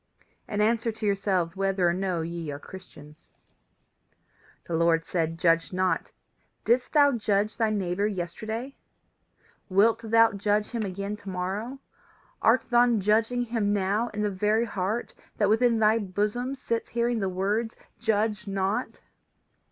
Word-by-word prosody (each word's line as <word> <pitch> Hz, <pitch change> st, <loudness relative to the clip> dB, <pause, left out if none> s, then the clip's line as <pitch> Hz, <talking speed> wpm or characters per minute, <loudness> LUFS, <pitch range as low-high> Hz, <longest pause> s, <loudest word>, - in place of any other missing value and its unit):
and 210 Hz, 0 st, 0 dB
answer 230 Hz, +1 st, +1 dB
to 220 Hz, 0 st, -6 dB
yourselves 195 Hz, -4 st, 0 dB
whether 195 Hz, -2 st, +1 dB
or 170 Hz, -, +2 dB
no 185 Hz, -2 st, -1 dB
ye 165 Hz, -1 st, -5 dB
are 140 Hz, -, -4 dB
Christians. 155 Hz, -3 st, -13 dB, 1.3 s
"The 170 Hz, -, -6 dB
Lord 165 Hz, 0 st, +2 dB
says: 165 Hz, -2 st, -1 dB
Judge 165 Hz, -1 st, +2 dB
not. 185 Hz, 0 st, 0 dB, 0.5 s
Didst 245 Hz, +2 st, +2 dB
thou 290 Hz, -2 st, +6 dB
judge 215 Hz, -3 st, 0 dB
thy 225 Hz, -3 st, +1 dB
neighbour 200 Hz, -1 st, 0 dB
yesterday? 220 Hz, +7 st, -5 dB, 0.9 s
Wilt 220 Hz, +4 st, +3 dB
thou 225 Hz, 0 st, +4 dB
judge 205 Hz, +1 st, 0 dB
him 235 Hz, -2 st, -2 dB
again 200 Hz, +1 st, -4 dB
to 205 Hz, -2 st, -10 dB
morrow? 195 Hz, +8 st, -3 dB, 0.6 s
Art -, -, +4 dB
thou 240 Hz, -1 st, +4 dB
judging 225 Hz, +4 st, +1 dB
him 225 Hz, -4 st, 0 dB
now 205 Hz, +3 st, 0 dB
in 210 Hz, -2 st, -4 dB
the 210 Hz, -, 0 dB
very 210 Hz, +4 st, +1 dB
heart 210 Hz, +2 st, -3 dB, 0.2 s
that 205 Hz, -2 st, +2 dB
within 230 Hz, +2 st, +3 dB
thy 220 Hz, +1 st, +4 dB
bosom 210 Hz, +6 st, -2 dB
sits 230 Hz, -3 st, -3 dB
hearing 235 Hz, 0 st, 0 dB
the 195 Hz, -2 st, -1 dB
words 205 Hz, +5 st, -1 dB, 0.2 s
Judge 215 Hz, -2 st, 0 dB
not? 195 Hz, +1 st, -2 dB
210 Hz, 145 wpm, -27 LUFS, 185-225 Hz, 1.3 s, thou